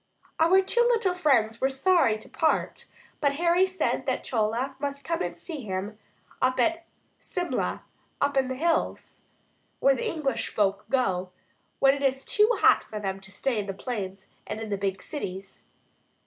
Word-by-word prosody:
Our 365 +4 +5
two 475 +5 +1
little 465 -6 +3
friends 235 -10 +2
were 265 - +3
sorry 270 -4 +3
to 215 - -10
part, 320 - 0 0.3
but 285 -2 +2
Harry 345 +4 +3
said 375 0 -1
that - - -1
Chola 235 +4 -1
must 280 0 -4
come 335 +1 -1
and - - -3
see 315 -6 -6
him 205 0 -4 0.4
at 260 +7 +1 0.3
Simla, 355 -1 -3 0.4
up 285 - +1
in 265 -1 +2
the 260 - -3
hills, 330 +4 -1 0.6
where 275 - +5
the - - -2
English 270 -7 -2
folk 200 -1 0
go 190 -9 +1 0.5
when 270 0 +5
it 280 - -3
gets 270 -1 0
too 425 +1 +4
hot - - +6
for 215 - -7
them 195 -1 -3
to 195 0 -13
stay 235 +3 -1
in 205 - -4
the 195 - -4
plains 195 -4 -5 0.2
and - - -4
in 220 -1 -6
the - - +1
big 195 -1 -2
cities. 195 -9 -7
265 Hz, 170 wpm, -27 LUFS, 210-325 Hz, 0.6 s, hot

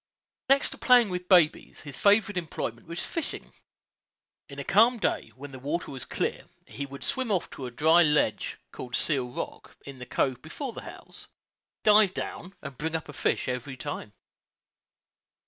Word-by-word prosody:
Next 275 +1 +4
to - - -7
playing 245 -4 +6
with 180 0 -4
babies, 175 -5 +4
his 145 -3 -6
favorite 205 0 +4
employment 155 -9 -4
was 170 +1 -4
fishing. 330 - -5 1.0
In - - -10
a - - -4
calm 235 +3 +5
day, 215 - -1
when 140 +1 -9
the 130 - -9
water 150 +7 -3
was 135 -3 -7
clear, - - -2 0.2
he 140 +1 -6
would 140 0 -9
swim 260 -3 -1
off 185 -4 0
to 130 - -6
a - - -5
dry 160 +7 +5
ledge, 150 -3 +2
called 125 -2 -5
Seal 135 -6 0
Rock, - - -7
in 140 -2 -9
the 125 - -8
cove 130 0 0
before 235 - -6
the - - -7
house, - - -10 0.6
dive 210 -2 +6
down, 185 +3 -5
and 140 -3 -8
bring 160 +1 -1
up 160 -2 -4
a - - -7
fish - - 0
every 125 +1 -4
time. 105 - -5
160 Hz, 175 wpm, -28 LUFS, 135-205 Hz, 1.0 s, playing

